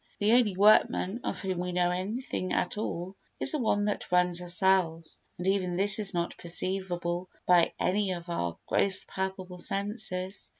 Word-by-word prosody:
The 210 Hz, +1 st, +2 dB
only 230 Hz, -6 st, +3 dB
workman 205 Hz, 0 st, +4 dB
of -, -, -3 dB
whom 185 Hz, -2 st, -2 dB
we 180 Hz, 0 st, -3 dB
know 175 Hz, 0 st, +2 dB
anything 185 Hz, +1 st, -3 dB
at -, -, 0 dB
all 190 Hz, -3 st, -4 dB, 0.2 s
is -, -, +2 dB
the 305 Hz, -, -1 dB
one 205 Hz, -4 st, +1 dB
that 205 Hz, -3 st, -3 dB
runs 180 Hz, -1 st, +3 dB
ourselves 175 Hz, -2 st, 0 dB, 0.2 s
and 180 Hz, -, -5 dB
even 190 Hz, -2 st, +1 dB
this 195 Hz, +3 st, +4 dB
is 205 Hz, -2 st, -1 dB
not 170 Hz, -1 st, -2 dB
perceivable 175 Hz, 0 st, -2 dB, 0.2 s
by 175 Hz, -2 st, +4 dB
any 200 Hz, +2 st, +1 dB
of 175 Hz, -1 st, -7 dB
our 85 Hz, -, -3 dB
gross 195 Hz, -1 st, +2 dB
palpable 190 Hz, -1 st, -5 dB
senses. 195 Hz, -1 st, -3 dB
185 Hz, 165 wpm, -29 LUFS, 175-200 Hz, 0.2 s, workman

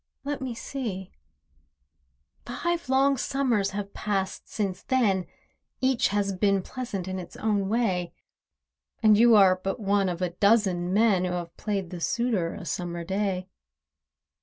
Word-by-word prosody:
Let 285 Hz, 0 st, -3 dB
me 255 Hz, -3 st, -4 dB
see: 220 Hz, -7 st, -5 dB, 1.4 s
Five 345 Hz, +6 st, -2 dB
long 270 Hz, +1 st, +3 dB
Summers 245 Hz, -7 st, 0 dB
have 200 Hz, 0 st, -5 dB
passed 195 Hz, -2 st, -3 dB
since 195 Hz, -3 st, -2 dB
then— 205 Hz, -8 st, +1 dB, 0.5 s
Each 260 Hz, -2 st, +2 dB
has 200 Hz, -1 st, 0 dB
been 195 Hz, 0 st, +2 dB
pleasant 210 Hz, -8 st, -5 dB
in 185 Hz, 0 st, -3 dB
its 180 Hz, -, -9 dB
own 205 Hz, -3 st, 0 dB
way— 195 Hz, -6 st, 0 dB, 0.9 s
And 215 Hz, -1 st, +7 dB
you 230 Hz, +1 st, +6 dB
are 190 Hz, -3 st, +7 dB
but 195 Hz, +6 st, -2 dB
one 200 Hz, -2 st, +1 dB
of 175 Hz, +1 st, -3 dB
a 180 Hz, -, -1 dB
dozen 190 Hz, -2 st, +2 dB
men 205 Hz, -2 st, +3 dB
Who 180 Hz, -, -2 dB
have 175 Hz, -1 st, -5 dB
played 200 Hz, -4 st, -3 dB
the 175 Hz, -2 st, -6 dB
suitor 230 Hz, -7 st, 0 dB
a 195 Hz, -, -8 dB
Summer 175 Hz, -1 st, -3 dB
day. 190 Hz, 0 st, -2 dB
200 Hz, 145 wpm, -27 LUFS, 185-235 Hz, 1.4 s, And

